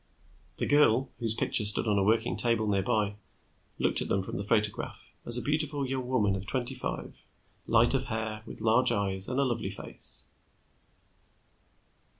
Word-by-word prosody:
The - - -1
girl, 135 -3 +3
whose 115 -2 -1
picture 110 - +1
stood 105 +2 +4
on 105 -1 +2
a - - +2
working 110 +3 +1
table 115 -2 +1
nearby, 105 +1 0 0.6
looked - - +3
at - - -3
them 95 - 0
from - - -7
the 100 - -3
photograph 105 0 -2 0.2
as 120 0 +7
a 125 - -2
beautiful 150 -1 -1
young 130 -1 -3
woman 105 -6 +1
of 95 0 -7
twenty 125 +2 -2
five, 125 - -6 0.5
light 115 +2 +4
of 135 -1 0
hair, 110 -2 -4
with - - -9
large 115 +3 +3
eyes 95 -1 -1
and 130 +2 -1
a - - +3
lovely 125 -3 -2
face. - - -7
115 Hz, 165 wpm, -29 LUFS, 105-130 Hz, 0.6 s, as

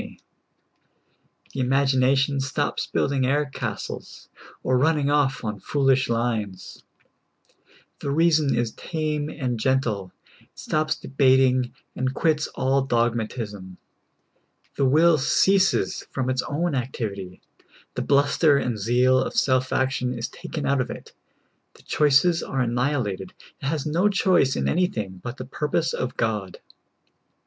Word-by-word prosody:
the - - -5
imagination 135 +1 +2
stops 135 +2 -2
build - - 0
ing 135 -2 0
air 145 +3 +2
castles, 135 - -6 0.3
or 130 - +1
running 145 +1 +2
off 140 -3 +1
on 105 -2 -4
foolish 135 +3 +1
lines; 110 -5 -3 1.2
the - - -4
rea 165 +4 +3
son 150 -3 +2
is 120 -1 0
tame 155 0 -3
and 130 -7 -3
gentle; 110 -7 0 0.3
it - - -27
stops 155 +1 -1
debating, 130 -3 +2 0.2
and 130 +1 -2
quits 155 -2 +1
all 135 +1 +1
dogmatism; 115 -6 -2 1.0
the 140 - +1
will 155 +4 +4
ceases 190 +7 +2
from 130 -1 -2
its 130 -1 0
own 170 +4 -1
activity; 105 -8 -4 0.5
the - - -3
bluster 145 +1 +3
and 120 -5 -2
zeal 125 +4 +3
of - - -2
self 130 - +2
action 125 -1 0
is 115 - -3
taken 155 - -6
out 140 -1 +2
of 125 - -4
it; - - -9 0.6
the - - -19
choices 150 +4 +3
are 130 - -2
annihilated; 120 -5 -1 0.3
it - - -6
has 150 -1 -2
no 170 +7 +2
choice 185 -9 +2
in - - -1
any 180 +2 +2
thing 95 - -6
but 120 +2 -6
the 130 - -6
purpose 150 +4 -1
of 125 - -3
God. 105 -5 -2
130 Hz, 135 wpm, -24 LUFS, 120-145 Hz, 1.2 s, will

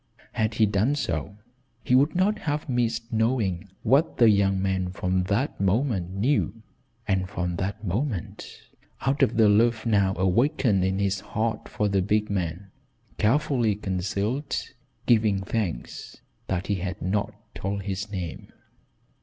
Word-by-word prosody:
Had 110 -2 -1
he 110 - +4
done 105 +7 +1
so, 85 - -3 0.5
he - - 0
would 140 +6 +4
not 205 +4 +2
have 150 -6 -2
missed 120 -2 -1
knowing 110 -5 0
what 140 +8 +3
the 115 -3 +6
young 100 -1 +2
man 95 -1 0
from 90 0 -1
that 100 +5 -1
moment 100 -2 +1
knew, 115 +3 0 0.4
and 95 -2 0
from 90 -3 -3
that 100 +5 -3
moment, 105 - -3 0.4
out 135 +1 0
of 115 - +3
the 110 -2 +6
love 110 +2 +3
now 100 -4 +2
awakened 105 - +2
in 95 +1 0
his 100 -1 0
heart 110 +2 -3
for 105 - 0
the 100 -1 +1
big 105 +2 0
man, 90 0 -3 0.5
carefully 120 -2 +2
concealed, 100 +7 -2 0.3
giving 110 -5 +3
thanks 95 - -4 0.3
that 95 0 -2
he 105 - 0
had 95 +1 -4
not 100 +3 -1 0.2
told 100 +1 -3
his 100 +1 -4
name. 90 -5 -6
105 Hz, 145 wpm, -26 LUFS, 95-115 Hz, 0.5 s, the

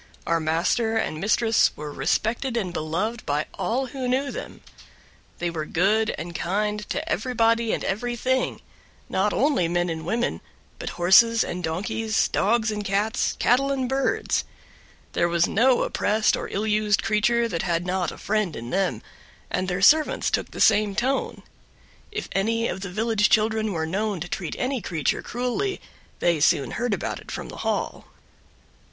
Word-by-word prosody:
Our 165 0 +1
master 170 +9 +1
and 155 -7 -2
mistress 220 +2 +3
were 150 -1 -6
respected 225 - -1
and 185 -6 -2
beloved 185 +9 -2
by 145 +1 -1
all 255 +4 -1
who 260 0 -4
knew 265 +3 0
them; - - -8 0.8
they 175 0 -2
were 155 -2 -4
good 215 +5 +2
and 170 +2 -6
kind 210 +4 -2
to 315 +3 -3
everybody 230 -6 +1
and - - -1
everything; 245 +5 -1 0.5
not 200 +2 +1
only 270 - +2
men 175 +1 0
and 160 0 -5
women, 230 +8 -1 0.4
but - - -4
horses 225 +6 +6
and 180 0 -5
donkeys, 210 +7 0
dogs 220 +1 +1
and 210 -1 -3
cats, 205 +3 0
cattle 275 +3 +3
and 265 -2 -1
birds; 270 +1 0 0.7
there 170 - +2
was 170 0 +3
no 250 +3 +3
oppressed 215 +1 +1
or - - -5
ill 210 +2 -2
used 210 -3 +2
creature 235 +2 +2
that 170 -7 -2
had 170 0 -1
not 180 -2 -1
a - - -10
friend 210 -6 -1
in 120 +1 -7
them, 190 -1 0 0.5
and 185 - -1
their 190 +1 -2
servants 310 +7 +4
took - - -1
the - - -9
same 210 -2 +4
tone. 260 +5 -1 0.7
If 425 - -4
any 230 +4 +1
of 190 - -4
the 195 - -5
village 215 +2 +1
children 220 0 +2
were 160 -3 -1
known 200 +3 -2
to 175 - -4
treat 175 -2 -4
any 255 -1 -1
creature 160 -7 -1
cruelly 250 +12 -2 0.4
they 170 -2 +2
soon 145 -2 +3
heard 240 -3 -1
about - - -4
it - - -14
from - - -5
the - - -9
Hall. - - -2
210 Hz, 165 wpm, -24 LUFS, 175-235 Hz, 0.8 s, horses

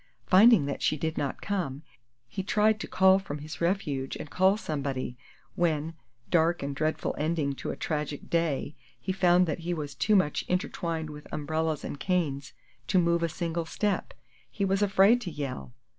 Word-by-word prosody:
Finding 195 -3 +6
that 140 - -4
she 155 - +1
did 160 +2 -2
not 140 -2 -3
come, 165 -9 -2 0.4
he 190 - -4
tried 210 +2 +2
to - - -5
crawl 190 0 +5
from 150 -7 -6
his 150 +3 -8
refuge 150 -7 -1
and 150 - -8
call 190 +2 +4
somebody, 140 - -3 0.4
when 160 -2 0 0.4
dark 170 -1 +3
and 140 0 -3
dreadful 155 +2 -1
ending 155 -2 0
to - - -6
a - - -3
tragic 150 -2 -3
day 160 -4 0 0.3
he 190 - -3
found 180 -1 +4
that 160 0 -3
he 175 +1 -2
was 145 -3 -5
too 210 +9 +2
much 185 -6 +2
intertwined 170 -5 -2
with 150 0 -11
umbrellas 155 0 -1
and 140 - -6
canes 150 -7 -1 0.3
to - - +2
move 170 -1 +3
a 170 - +1
single 165 0 -3
step. 205 +3 -1 0.3
He 200 - -2
was 195 +1 +1
afraid 205 +4 +5
to 195 - -4
yell! 140 -5 -5
165 Hz, 175 wpm, -28 LUFS, 150-190 Hz, 0.4 s, Finding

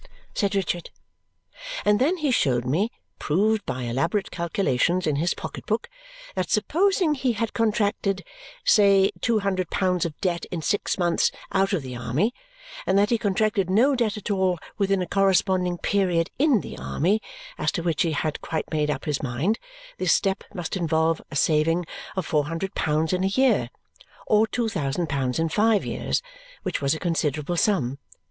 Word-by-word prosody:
said 200 0 0
Richard. 175 -3 -1 1.0
And 210 0 +4
then 325 +8 +3
he 300 -5 0
showed 125 - +2
me, 170 - +1 0.3
proved 205 +7 +1
by 125 0 -3
elaborate 135 - -1
calculations 170 0 0
in 150 -3 +1
his 170 +4 0
pocket - - -7
book, 220 +1 -1 0.5
that 185 -1 -2
supposing 350 - +2
he 260 -4 0
had 230 0 -2
contracted, 205 -3 0 0.4
say, 200 -2 +5
two 230 -3 +2
hundred 185 -3 -1
pounds 180 -2 +1
of 160 -3 -4
debt 175 -4 -1
in 170 -3 -5
six 205 - 0
months 175 -2 +2 0.2
out 195 0 +2
of 185 -8 0
the 130 -1 -6
army; 125 - 0 0.5
and 190 - +3
that 205 +2 +3
he 235 - +2
contracted 205 -1 +1
no 245 +9 +4
debt 225 -4 0
at 210 - -4
all 190 -2 +1 0.2
within 195 -2 +1
a - - -6
corresponding 185 -1 +2
period 180 -4 +1
in 275 - +4
the - - -8
army 200 +8 0 0.4
as - - +1
to 170 - -3
which 170 +1 0
he 165 -4 +1
had 155 0 -2
quite 160 - -3
made 150 -1 0
up 150 - -2
his 150 -3 -1
mind; 140 - -1 0.4
this - - +2
step 195 -1 0
must 175 -3 -4
involve 165 -2 +1
a - - -8
saving 160 +4 +2 0.3
of 190 - -2
four 150 -3 +1
hundred 165 +5 -4
pounds 155 +2 0
in 185 0 +1
a 195 +1 0
year, 265 -1 +3 0.6
or 215 +1 +4
two 235 +1 -1
thousand 165 -3 -1
pounds 135 -3 -1
in 165 - +1
five 210 +5 +2
years, - - -1 0.4
which - - -2
was 140 +2 +2
a - - -6
considerable 160 -1 -1
sum. 140 - +1
185 Hz, 175 wpm, -25 LUFS, 160-210 Hz, 1.0 s, say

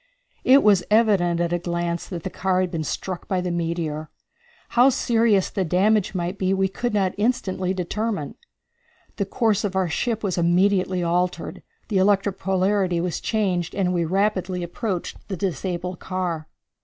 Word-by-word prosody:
It 270 +2 +6
was 200 -4 +5
evident 200 -6 +3
at 175 0 0
a 175 - +1
glance 170 0 -2
that 170 -4 -5
the 190 - -4
car 185 -1 0
had 185 -2 -1
been 160 -1 -2
struck 180 +4 -4
by 185 - 0
the 180 0 -2
meteor. 165 -3 -2 0.6
How 250 +2 +5
serious 230 -6 +2
the 195 - -1
damage 195 +4 +2
might 180 +2 -3
be 190 0 +1
we 190 0 +1
could 240 +5 -2
not 195 -3 +1
instantly 205 -5 0
determine. 195 -2 -2 0.8
The 200 - 0
course 220 -1 +1
of 195 -2 -2
our 190 -2 +1
ship 225 +7 -1
was 185 -4 -1
immediately 185 +1 +2
altered, 175 +1 -1 0.3
the 200 -4 +2
electric 195 0 +2
polarity 190 -1 +1
was 175 0 -2
changed, 185 -6 -1
and 185 -2 +1
we 175 -1 +1
rapidly 185 0 0
approached 180 +1 -4
the 190 - -4
disabled 180 -1 -3
car. 175 -4 -3
185 Hz, 165 wpm, -23 LUFS, 175-205 Hz, 0.8 s, It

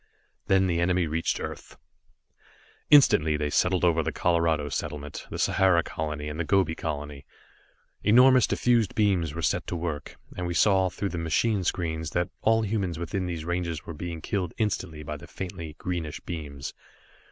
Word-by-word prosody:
Then 95 0 +4
the 85 -2 0
enemy 90 0 +2
reached 80 +1 -1
Earth. - - -7 1.1
Instantly 80 - +6
they 75 -1 -2
settled 90 +2 +2
over 85 -1 +3
the - - -2
Colorado 85 -4 +1
settlement, 75 0 -5
the - - -5
Sahara 95 -3 +3
colony, 75 -2 -4
and 75 +2 -5
the - - +1
Gobi 95 -1 +2
colony. 75 -3 -5 0.8
Enormous, 125 +3 +6
diffused 120 -4 +2
beams 90 -8 +1
were 85 - -4
set - - 0
to - - -3
work, 80 -4 -4 0.2
and 90 -1 -3
we 85 - -3
saw, 95 -1 +4
through 100 +2 -3
the 85 - -4
machine 95 +6 +1
screens, 80 -3 -2
that 85 - 0
all 110 0 +3
humans 100 -6 -1
within 90 +2 -3
these 85 -3 -4
ranges 85 -3 -2
were 80 - -6
being 85 +1 -6
killed 90 -3 -2
instantly 95 -8 -2
by 75 +1 -5
the - - -12
faintly 85 -4 -7
greenish 85 -3 -4
beams. 75 -5 -6
85 Hz, 165 wpm, -27 LUFS, 80-95 Hz, 1.1 s, Instantly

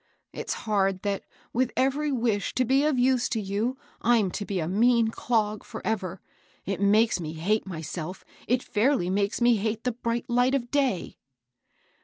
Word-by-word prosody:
It's - - -3
hard 195 -3 +1
that, 200 -1 -2 0.3
with 250 +1 +1
every 280 +3 +1
wish 230 -5 0
to 255 - +2
be 265 +3 +3
of 305 -4 +2
use 250 0 +2
to 225 - -1
you, 210 +6 -2 0.2
I'm 225 -5 +3
to 205 - -4
be 195 -2 -2
a 160 - -2
mean 230 +4 +3
clog 215 -3 -1
forever 195 -5 -4 0.4
I 195 - -2
It 195 - -3
makes 210 +1 +4
me 160 -2 -5
hate 195 +7 0
myself, 165 +1 -6
— - - -24
it 250 +2 +2
fidrly 210 -5 +1
makes 200 +4 0
me 240 -1 +5
hate 215 +2 -2
the 250 - +1
bright 235 +1 -3
light 245 +2 +3
of 240 -3 -3
day." 270 -10 0
220 Hz, 180 wpm, -27 LUFS, 195-245 Hz, 0.4 s, me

